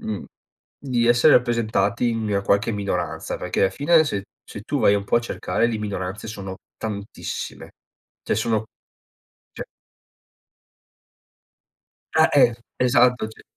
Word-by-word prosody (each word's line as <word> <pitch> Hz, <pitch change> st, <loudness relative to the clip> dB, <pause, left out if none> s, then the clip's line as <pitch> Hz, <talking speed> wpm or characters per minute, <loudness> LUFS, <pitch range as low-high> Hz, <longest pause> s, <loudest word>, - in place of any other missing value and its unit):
mhmm, 105 Hz, -4 st, -4 dB, 0.5 s
di 125 Hz, -4 st, 0 dB
essere 120 Hz, +5 st, +6 dB
rappresentati 115 Hz, -1 st, +1 dB
in 110 Hz, -3 st, -1 dB
qualche 100 Hz, +3 st, +2 dB
minoranza 100 Hz, -1 st, -3 dB
perché 90 Hz, -, -3 dB
alla 95 Hz, -1 st, +4 dB
fine, 155 Hz, -, +4 dB
se 100 Hz, -8 st, -3 dB, 0.2 s
se -, -, -9 dB
tu -, -, -2 dB
vai 100 Hz, -, +5 dB
un 100 Hz, -, -3 dB
po' -, -, +2 dB
a -, -, +3 dB
cercare, 120 Hz, 0 st, -1 dB
le 110 Hz, -2 st, -2 dB
minoranze 100 Hz, 0 st, -4 dB
sono 95 Hz, -3 st, -6 dB, 0.2 s
tantissime, 105 Hz, -2 st, -6 dB, 0.5 s
cioè -, -, -1 dB
sono 110 Hz, -1 st, 0 dB, 0.9 s
cioè -, -, -6 dB, 2.5 s
Ah -, -, +6 dB
eh, 120 Hz, -, +5 dB, 0.2 s
esatto 125 Hz, -2 st, +3 dB
cioé. 110 Hz, -, -15 dB
110 Hz, 130 wpm, -23 LUFS, 100-120 Hz, 2.5 s, essere